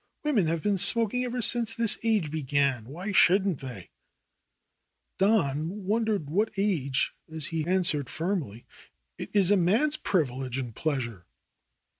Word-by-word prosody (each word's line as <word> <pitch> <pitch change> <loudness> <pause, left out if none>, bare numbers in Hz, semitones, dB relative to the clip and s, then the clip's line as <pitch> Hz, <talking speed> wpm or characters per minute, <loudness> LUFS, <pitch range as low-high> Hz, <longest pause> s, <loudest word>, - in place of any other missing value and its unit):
Women 245 - +1
have 165 0 -2
been 205 -1 +1
smok 225 +4 +3
ing 250 0 0
ever 245 0 -3
since 230 -1 +3
this 230 -2 +2
age 215 -9 0
began. 140 -5 0
Why 175 - -6
shouldn't 190 -3 +3
they 125 -9 -9 0.6
?" - - -53
Don 190 -2 0
wondered 215 -5 0
what 205 +9 0
age 155 -10 0 0.2
as 160 -2 0
he 160 -1 -2
answered 170 -7 0
firmly, 160 - -4 0.5
'Tt - - -6
is 200 -2 +3
a 205 - +5
man's 230 - +2
privilege 130 - -1
and 120 -4 -5
pleasure." 120 - -3
175 Hz, 145 wpm, -27 LUFS, 140-210 Hz, 0.6 s, a